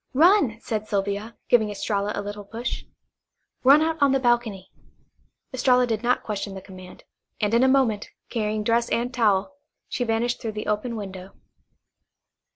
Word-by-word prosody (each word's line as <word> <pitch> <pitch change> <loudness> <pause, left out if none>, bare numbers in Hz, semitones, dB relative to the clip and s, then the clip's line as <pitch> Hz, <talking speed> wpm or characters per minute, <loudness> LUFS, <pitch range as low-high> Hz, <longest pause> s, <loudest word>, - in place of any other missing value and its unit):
"Run," 320 - +5
said 215 -1 -3
Sylvia, 200 +3 -2
giving 220 -3 +4
Estralla 205 0 -2
a 205 - -3
little 205 0 -6
push. 230 +4 -5 0.8
"Run 280 +4 +7
out 320 0 -1
on 280 -1 +5
the 270 - +3
balcony." 235 -6 0 0.8
Estralla 250 -1 +3
did 225 -3 -2
not 250 +1 +1
question 205 -2 -4
the - - -5
command, 185 -1 -13 0.4
and 210 +1 0
in 235 +2 +5
a - - +5
moment, 260 -6 +2 0.2
carrying 215 -2 -2
dress 235 +2 +1
and 245 +2 -1
towel, 215 0 +2 0.3
she - - -4
had 245 - 0
vanished 230 +2 0
through 225 -2 -4
the 215 0 -5
open 215 +3 -1
window. 190 -3 -7
225 Hz, 165 wpm, -24 LUFS, 205-245 Hz, 0.8 s, Run